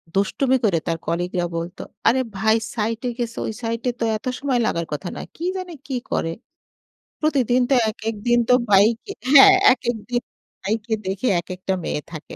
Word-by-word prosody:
দুষ্টুমি 255 Hz, +7 st, +2 dB
করে 170 Hz, -6 st, +2 dB
তার 165 Hz, -1 st, 0 dB
কলিগরা 175 Hz, +1 st, -1 dB
বলতো, 170 Hz, +2 st, -5 dB, 0.2 s
"আরে 260 Hz, +3 st, +4 dB, 0.2 s
ভাই 220 Hz, +2 st, +3 dB, 0.2 s
সাইটে 230 Hz, +3 st, -2 dB
গেছে 235 Hz, -1 st, -3 dB
ওই 220 Hz, -, -3 dB
সাইটে 230 Hz, +2 st, -1 dB
এ -, -, -36 dB
তো -, -, +2 dB
এত 215 Hz, -, -19 dB
সময় 265 Hz, -3 st, 0 dB
লাগার 170 Hz, 0 st, -1 dB
কথা 175 Hz, +5 st, -4 dB
না, -, -, -5 dB
কি 335 Hz, -, -5 dB
জানে 365 Hz, -2 st, -6 dB
কি 265 Hz, -, -3 dB, 0.2 s
করে। 165 Hz, 0 st, -1 dB, 0.9 s
প্রতিদিন 255 Hz, -5 st, +2 dB
তো -, -, +4 dB, 0.2 s
এক, 215 Hz, -, -7 dB
এক, 225 Hz, -, -4 dB
দিন 240 Hz, 0 st, +4 dB
তো -, -, +7 dB, 0.2 s
ভাইকে 220 Hz, -, +4 dB, 0.2 s
হ্যা 270 Hz, -, +11 dB, 0.3 s
এক, 255 Hz, -, -8 dB
এক, 225 Hz, -, -6 dB
দিন 245 Hz, 0 st, 0 dB, 0.4 s
ভাইকে 220 Hz, +2 st, -2 dB
দেখে 195 Hz, +6 st, -2 dB
এক 170 Hz, -, -9 dB
একটা 190 Hz, +1 st, -2 dB
মেয়ে 150 Hz, -, -2 dB
থাকে"। 155 Hz, -, -8 dB
225 Hz, 190 wpm, -22 LUFS, 190-250 Hz, 0.9 s, হ্যা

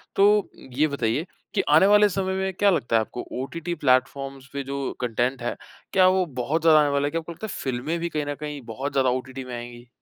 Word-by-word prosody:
तो 205 Hz, 0 st, +4 dB, 0.3 s
ये 155 Hz, +2 st, +4 dB
बताइए 140 Hz, +1 st, -1 dB, 0.3 s
कि -, -, +2 dB
आने 155 Hz, +5 st, +6 dB
वाले 210 Hz, 0 st, +6 dB
समय 190 Hz, 0 st, -1 dB
में 190 Hz, 0 st, -1 dB
क्या 200 Hz, +2 st, +3 dB
लगता 140 Hz, -11 st, +1 dB
है -, -, +6 dB
आपको? 115 Hz, +2 st, -6 dB, 0.2 s
ओटीटी 170 Hz, +5 st, -4 dB
प्लेफ़ॉर्म्स 135 Hz, 0 st, 0 dB
पे 140 Hz, 0 st, -3 dB
जो 140 Hz, +1 st, -4 dB, 0.2 s
कंटेंट 125 Hz, +2 st, -1 dB
है, 120 Hz, -, -2 dB, 0.4 s
क्या 185 Hz, -1 st, +6 dB
वो 185 Hz, 0 st, +3 dB, 0.2 s
बहुत 155 Hz, +6 st, 0 dB
ज़्यादा 160 Hz, -1 st, +6 dB
आने 150 Hz, -1 st, +3 dB
वाला 140 Hz, 0 st, +1 dB
है? -, -, -3 dB
क्या 165 Hz, -, -1 dB
आपको 165 Hz, +1 st, -8 dB
लगता 195 Hz, +6 st, -6 dB
है -, -, -6 dB
फ़िल्में 130 Hz, +5 st, -2 dB
भी 170 Hz, +1 st, -2 dB
कहीं 150 Hz, -2 st, -2 dB
न 145 Hz, 0 st, -3 dB
कहीं 150 Hz, -2 st, -5 dB
बहुत 135 Hz, +5 st, -3 dB
ज़्यादा 130 Hz, -2 st, +2 dB
ओटीटी 130 Hz, +1 st, -3 dB
में 125 Hz, -1 st, -7 dB
आएँगी? 120 Hz, 0 st, -9 dB
145 Hz, 235 wpm, -24 LUFS, 130-170 Hz, 0.4 s, आने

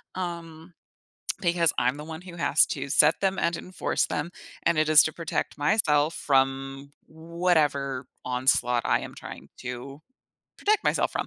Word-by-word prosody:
um, 170 Hz, -2 st, -6 dB, 0.7 s
because 170 Hz, -3 st, +2 dB
I'm 125 Hz, +3 st, +1 dB
the 150 Hz, -, -8 dB
one 160 Hz, +2 st, -8 dB
who 180 Hz, -2 st, -11 dB
has 155 Hz, -3 st, +3 dB
to 140 Hz, -1 st, -4 dB
set 150 Hz, +3 st, +5 dB
them 195 Hz, -1 st, 0 dB
and 170 Hz, 0 st, 0 dB
enforce 185 Hz, -, -2 dB
them, 150 Hz, +4 st, -3 dB, 0.3 s
and 170 Hz, -2 st, +2 dB
it 155 Hz, 0 st, +2 dB
is 155 Hz, -1 st, +8 dB
to 155 Hz, -, -2 dB
protect 165 Hz, -2 st, -4 dB
myself 150 Hz, -2 st, +2 dB
from 135 Hz, 0 st, 0 dB, 0.2 s
whatever 155 Hz, -5 st, -1 dB, 0.2 s
onslaught 125 Hz, -1 st, +1 dB
I -, -, +2 dB
am -, -, -8 dB
trying -, -, -10 dB
to 125 Hz, +3 st, -7 dB, 0.6 s
protect 425 Hz, +1 st, +2 dB
myself -, -, +1 dB
from. -, -, -2 dB
155 Hz, 155 wpm, -26 LUFS, 135-170 Hz, 0.7 s, is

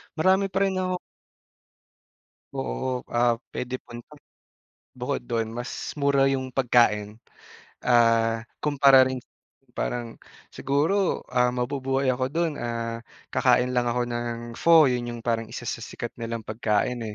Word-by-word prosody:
marami 190 Hz, +4 st, +3 dB
pa 190 Hz, -, 0 dB
rin 195 Hz, -1 st, 0 dB
ako 185 Hz, -1 st, -1 dB, 1.6 s
Oo, 130 Hz, -1 st, -3 dB
ap 120 Hz, -1 st, +3 dB, 0.2 s
puwedeng 125 Hz, +1 st, -3 dB
punta 120 Hz, +5 st, -11 dB, 0.8 s
bukod -, -, -2 dB
dun, 115 Hz, -1 st, -1 dB
mas 120 Hz, +2 st, -5 dB
mura 140 Hz, -1 st, +3 dB
yung 130 Hz, -1 st, -2 dB
pagkain, 115 Hz, -4 st, +2 dB, 0.7 s
ah, 115 Hz, -2 st, +4 dB, 0.2 s
kumpara 140 Hz, -3 st, +5 dB
rin 130 Hz, -1 st, -3 dB, 0.5 s
parang 120 Hz, -2 st, -4 dB, 0.3 s
siguro, 160 Hz, +8 st, 0 dB
ah, 125 Hz, 0 st, +3 dB
mabubuhay 135 Hz, +1 st, 0 dB
ako 130 Hz, +1 st, -1 dB
dun, 165 Hz, +2 st, 0 dB
ah, 115 Hz, -1 st, -3 dB, 0.3 s
kakain 125 Hz, +1 st, +3 dB
lang 125 Hz, -1 st, +1 dB
ako 125 Hz, +1 st, 0 dB
ng 120 Hz, 0 st, -3 dB, 0.2 s
pho. 165 Hz, -2 st, +7 dB
Yun, 120 Hz, -1 st, -2 dB
yung -, -, -8 dB
parang 115 Hz, -2 st, -1 dB
isa 120 Hz, -, -7 dB
sa 115 Hz, -, -3 dB
sikat 115 Hz, +1 st, -6 dB
nilang 115 Hz, -1 st, -4 dB
pagkain, 110 Hz, +2 st, -1 dB
125 Hz, 130 wpm, -25 LUFS, 115-135 Hz, 1.6 s, pho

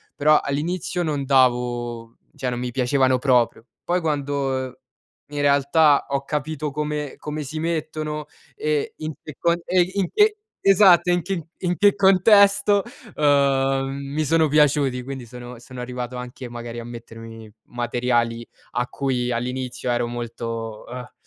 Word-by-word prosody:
però 150 Hz, +1 st, +4 dB
all'inizio 175 Hz, +5 st, -2 dB
non 145 Hz, -3 st, -2 dB
davo 120 Hz, -3 st, +1 dB, 0.2 s
cioè, 125 Hz, -, -2 dB
non 120 Hz, -, -3 dB
mi 125 Hz, 0 st, -3 dB
piacevano 130 Hz, 0 st, +2 dB
proprio. 125 Hz, -4 st, +2 dB, 0.2 s
Poi 180 Hz, +1 st, 0 dB
quando 140 Hz, -4 st, -2 dB, 0.5 s
in 145 Hz, 0 st, -6 dB
realtà 145 Hz, +1 st, +4 dB
ho 140 Hz, 0 st, -2 dB
capito 150 Hz, 0 st, -3 dB
come 150 Hz, -1 st, -3 dB
come 150 Hz, 0 st, -5 dB
si 155 Hz, +3 st, -6 dB
mettono 155 Hz, -2 st, -3 dB, 0.3 s
e 150 Hz, -1 st, -1 dB
in 155 Hz, 0 st, -5 dB
che 155 Hz, -, -9 dB
con 170 Hz, 0 st, +3 dB
e 185 Hz, -1 st, +3 dB
in 195 Hz, -3 st, 0 dB
che 425 Hz, 0 st, +4 dB, 0.3 s
esatto 185 Hz, -3 st, +6 dB
in 175 Hz, 0 st, +2 dB
che 170 Hz, -2 st, -4 dB
in 180 Hz, -1 st, -1 dB
che 205 Hz, -1 st, +4 dB
contesto, 200 Hz, +1 st, +5 dB, 0.3 s
uhm, 135 Hz, -2 st, +2 dB, 0.3 s
mi 155 Hz, +1 st, 0 dB
sono 160 Hz, +1 st, +3 dB
piaciuti, 145 Hz, -3 st, +2 dB
quindi 135 Hz, -2 st, -7 dB
sono 125 Hz, +1 st, -10 dB
sono 125 Hz, +1 st, -11 dB
arrivato 125 Hz, 0 st, -5 dB
anche 125 Hz, 0 st, -8 dB
magari 120 Hz, 0 st, -7 dB
a -, -, -6 dB
mettermi 115 Hz, -2 st, -10 dB, 0.2 s
materiali 120 Hz, -1 st, -1 dB, 0.3 s
a 125 Hz, 0 st, -1 dB
cui 125 Hz, -3 st, -2 dB
all'inizio 125 Hz, +1 st, -3 dB
ero 120 Hz, 0 st, 0 dB
molto, 115 Hz, -2 st, -5 dB
uhm 125 Hz, 0 st, -8 dB
140 Hz, 145 wpm, -23 LUFS, 125-155 Hz, 0.5 s, esatto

